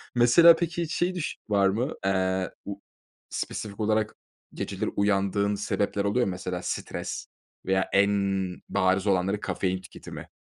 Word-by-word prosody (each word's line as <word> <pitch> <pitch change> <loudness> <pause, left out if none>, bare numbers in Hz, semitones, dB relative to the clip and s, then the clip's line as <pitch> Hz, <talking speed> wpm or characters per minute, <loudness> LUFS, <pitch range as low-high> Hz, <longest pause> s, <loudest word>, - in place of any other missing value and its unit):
Mesela 165 +8 +8
peki 170 +1 -2
hiç 165 +2 -4
şey 180 +1 0
düş 170 - -3
var 100 -1 +4
mı? 120 +9 -1
Eee, 95 -1 +1 0.2
u 100 0 -6 0.5
spesifik 100 0 -4
olarak 110 0 +1 0.4
geceleri - - -3
uyandığın 100 0 +1
sebepler 100 0 -1
oluyor 120 +5 +2
mu? 95 - -1
Mesela 90 0 -4
stres? - - -4 0.4
Veya 95 0 +1
en 100 +1 +5 0.6
bariz 95 +2 +2
olanları 95 +1 +2
kafein 95 -2 -2
tüketimi. 90 - -10
100 Hz, 140 wpm, -27 LUFS, 95-110 Hz, 0.6 s, Mesela